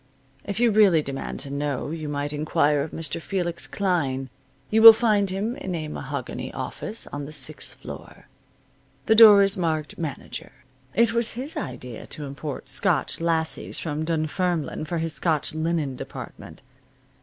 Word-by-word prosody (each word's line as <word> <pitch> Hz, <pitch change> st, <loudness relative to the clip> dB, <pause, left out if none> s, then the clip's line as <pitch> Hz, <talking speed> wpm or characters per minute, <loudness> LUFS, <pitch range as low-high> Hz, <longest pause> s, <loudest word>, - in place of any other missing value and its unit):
If 200 Hz, 0 st, -4 dB
you 240 Hz, -1 st, +4 dB
really 200 Hz, -7 st, +5 dB
demand 135 Hz, -1 st, -5 dB
to 140 Hz, -, -4 dB
know 145 Hz, 0 st, -2 dB
you 155 Hz, -2 st, -5 dB
might 145 Hz, 0 st, -3 dB
inquire 150 Hz, -1 st, +1 dB
of 150 Hz, -, -3 dB
Mr. 165 Hz, +1 st, -3 dB
Felix 175 Hz, -2 st, -2 dB
Klein. 140 Hz, -9 st, -1 dB, 0.4 s
You 220 Hz, +1 st, +4 dB
will 225 Hz, 0 st, +13 dB
find 215 Hz, -3 st, +2 dB
him 205 Hz, +6 st, -2 dB
in 185 Hz, -2 st, -4 dB
a 155 Hz, -2 st, -4 dB
mahogany -, -, -5 dB
office 220 Hz, -, -3 dB
on 145 Hz, 0 st, -4 dB
the 150 Hz, -, -9 dB
sixth 150 Hz, 0 st, -2 dB
floor. -, -, -11 dB, 0.8 s
The 220 Hz, -, +4 dB
door 215 Hz, -3 st, +9 dB
is 195 Hz, 0 st, +1 dB
marked 160 Hz, -4 st, -2 dB
manager. 150 Hz, -4 st, -6 dB, 0.4 s
It 230 Hz, 0 st, +3 dB
was 235 Hz, -1 st, 0 dB
his 265 Hz, +6 st, -6 dB
idea 125 Hz, -3 st, -6 dB
to 150 Hz, -1 st, -6 dB
import 140 Hz, +1 st, -6 dB
Scotch -, -, +2 dB
lassies 165 Hz, -1 st, -1 dB
from 155 Hz, -1 st, -3 dB
Dunfermline 160 Hz, 0 st, -1 dB
for 170 Hz, +2 st, -3 dB
his 165 Hz, -1 st, -2 dB
Scotch 155 Hz, +1 st, 0 dB
linen 155 Hz, -4 st, -1 dB
department. 80 Hz, -, -9 dB
160 Hz, 155 wpm, -24 LUFS, 145-195 Hz, 0.8 s, will